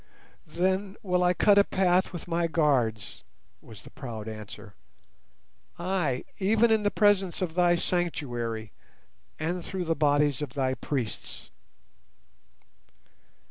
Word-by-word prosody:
"Then 190 +5 -1
will 180 -2 +1
I 180 0 +3
cut 205 +3 +5
a - - +7
path 185 -1 +2
with 175 - -7
my 170 0 0
guards," 125 - 0 0.4
was 110 -4 -13
the - - -13
proud 115 -7 -7
answer; 105 -1 -9 1.0
"ay, 175 -8 -1 0.2
even 220 +4 +3
in 220 -1 +4
the 205 - +2
presence 205 -4 +2
of 180 -4 -2
thy 175 0 +4
sanctuary, 120 - -2 0.7
and 170 +3 -2
through 185 0 -4
the 165 - +1
bodies 145 -2 +2
of 140 -5 -5
thy 130 -2 +1
priests." 125 -2 -5
165 Hz, 125 wpm, -27 LUFS, 130-185 Hz, 1.0 s, a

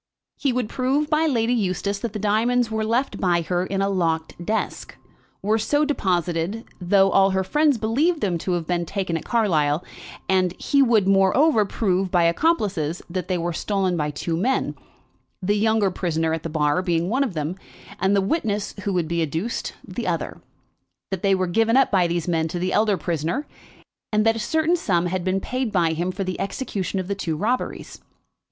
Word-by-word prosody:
He 275 - +1
would 245 -2 -1
prove 270 +6 0
by 310 +1 +3
Lady 240 -4 +1
Eustace 200 -2 -1
that 230 +1 -3
the - - -5
diamonds 225 +3 +1
were 220 0 -1
left 235 +5 0
by 175 -3 +2
her 175 +2 0
in 195 0 -1
a - - +1
locked 165 -4 0
desk, 220 +5 -3 0.5
were 215 +2 +2
so 290 +7 +2
deposited, 180 - -1 0.2
though 195 +2 +4
all 195 0 +5
her 190 0 0
friends 295 +5 +2
believed 280 +11 +1
them 180 - -1
to 180 - -2
have 175 -2 -1
been 175 +1 0
taken 190 -3 -2
at 165 - -4
Carlisle; 165 -9 +1 0.4
and 185 -2 +2
he 280 -1 +2
would, 225 -7 +3
moreover, 205 - +4
prove 195 -2 0
by 175 -1 +3
accomplices 180 - +1
that 185 -1 -3
they 185 - 0
were 170 0 -2
stolen 190 0 0
by 150 -3 -1
two 165 +3 -3
men, 245 +11 0 0.7
the 200 +2 0
younger 210 -1 +2
prisoner 160 -3 -1
at 160 - -2
the 165 - -5
bar 150 +2 +1
being 170 -2 0
one 255 +7 +1
of 230 -10 -4
them, 155 +3 -2 0.4
and 190 +1 +2
the 200 - +3
witness 210 - -1
who 200 - 0
would 175 -3 0
be 170 +1 -1
adduced, 165 +9 -2
the - - -5
other, - - -3 0.7
that 190 -2 -3
they 195 -1 +3
were 185 0 0
given 225 +7 +2
up 270 - +4
by 185 -4 +3
these 170 0 -2
men 165 -2 +1
to 170 - -4
the 185 +1 -1
elder 210 -2 +3
prisoner, 170 - -2 0.7
and 215 0 +2
that 225 0 +4
a - - -3
certain 315 +9 +1
sum 180 - 0
had 180 0 -2
been 185 +1 0
paid 255 +3 -2
by 170 -5 +2
him 175 +3 -1
for 195 +1 -3
the 185 -1 -4
execution 195 -3 -3
of 185 - -4
the 200 - -1
two 165 -5 -3
robberies. 240 +8 -3
195 Hz, 200 wpm, -23 LUFS, 175-225 Hz, 0.7 s, all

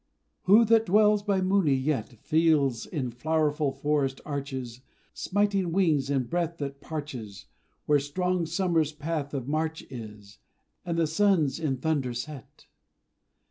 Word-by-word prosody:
Who 210 +5 +7
that 225 0 +4
dwells 210 +2 +4
by 200 -2 0
Mooni 185 -6 +3
yet, 130 -4 -1
Feels, 155 -7 +2
in 130 -7 -3
flowerful 150 +2 0
forest 135 -1 -1
arches, 130 -4 -5 0.3
Smiting 200 -3 0
wings 160 -7 +2
and 135 -4 0
breath 170 +2 -2
that 140 -2 -5
parches 130 -11 -7 0.4
Where 150 -1 +4
strong 180 +4 -1
Summer's 165 -3 +1
path 150 -1 -3
of 130 -2 -4
march 160 +2 -2
is, 105 -4 -10 0.4
And 170 -1 -3
the 165 - +3
suns 160 -4 +2
in 145 -5 -1
thunder 135 -4 -1
set? 135 +1 -8
155 Hz, 135 wpm, -27 LUFS, 135-175 Hz, 0.4 s, Who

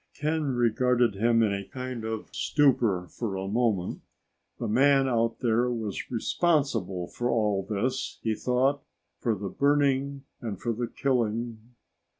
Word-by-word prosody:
Ken 150 -2 -1
regarded 120 0 +2
him 115 +3 +3
in 105 -2 +2
a 100 0 -3
kind 130 -3 -5
of 110 -1 -4
stupor 115 -11 +2
for 105 -1 -4
a 95 0 -3
moment. 105 -4 0 0.6
The 115 - -3
man 135 +4 +4
out 115 -2 0
there 120 0 +2
was 110 -5 -4
responsible 115 - 0
for 120 0 -3
all 105 -4 +1
this, 110 +7 -2
he 110 - +1
thought, 130 +5 +1 0.4
for 115 -3 0
the 100 0 -5
burning 140 +2 +1 0.2
and 110 -6 -5
for 120 - -1
the 120 +2 -2
killing.... 120 -2 -2
120 Hz, 145 wpm, -27 LUFS, 110-130 Hz, 0.6 s, man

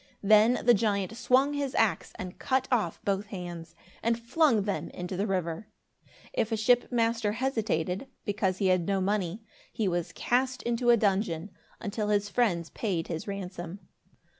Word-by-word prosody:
Then 215 +4 +5
the 240 - +7
giant 205 -1 0
swung 260 +4 +3
his 280 -2 -2
axe 220 -3 +1
and 185 -1 -7
cut 260 0 +1
off 215 -10 +1
both 200 +1 0
hands, 175 -4 -7 0.3
and 230 0 +1
flung 235 -2 +3
them 200 0 -2
into 180 +1 -5
the 200 +4 -1
river. 180 0 -2 0.7
If 225 - 0
a 225 - +1
ship 245 +4 +3
master 230 -3 +1
hesitated, 220 - -1 0.2
because 195 -2 0
he 190 -1 +2
had 185 -2 +2
no 195 -1 +1
money, 195 +1 -1 0.3
he 220 -3 -1
was 175 -1 -1
cast 255 +5 0
into 240 +1 0
a 240 - +7
dungeon, 195 -4 0 0.3
until 210 0 -3
his 205 -1 +1
friends 185 -9 +1
paid 180 -7 -2
his 165 +2 -4
ransom. 185 -3 -5
205 Hz, 165 wpm, -29 LUFS, 185-235 Hz, 0.7 s, the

